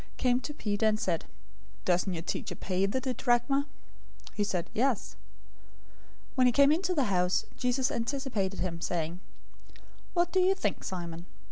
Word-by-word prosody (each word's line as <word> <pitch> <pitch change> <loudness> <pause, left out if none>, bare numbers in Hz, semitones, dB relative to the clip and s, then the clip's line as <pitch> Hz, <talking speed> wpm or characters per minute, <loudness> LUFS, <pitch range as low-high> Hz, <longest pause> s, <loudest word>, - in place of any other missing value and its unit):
} - - -27
came 250 -1 +3
to 295 - -5
Peter, 220 -6 0
and 215 0 +2
said, 175 -7 -1 0.6
"Doesn't 180 +2 +2
your 165 - -4
teacher - - -3
pay 190 +1 0
the 230 +6 0
didrachma?" 260 +2 +1 0.6
017:025 - - -27
He 205 - 0
said, 180 -4 -1
"Yes." 250 0 0 1.2
When 255 -2 +4
he - - +5
came 280 +3 +6
into 360 +3 +1
the 285 - +3
house, 180 -4 +2
Jesus 250 +1 +1
anticipated 230 -6 -2
him, 170 -2 -3
saying, 170 0 -2 1.0
"What 350 0 +2
do 375 - +3
you 370 +1 +4
think, 205 - -2
Simon? 170 -2 -5
225 Hz, 160 wpm, -30 LUFS, 185-270 Hz, 1.2 s, came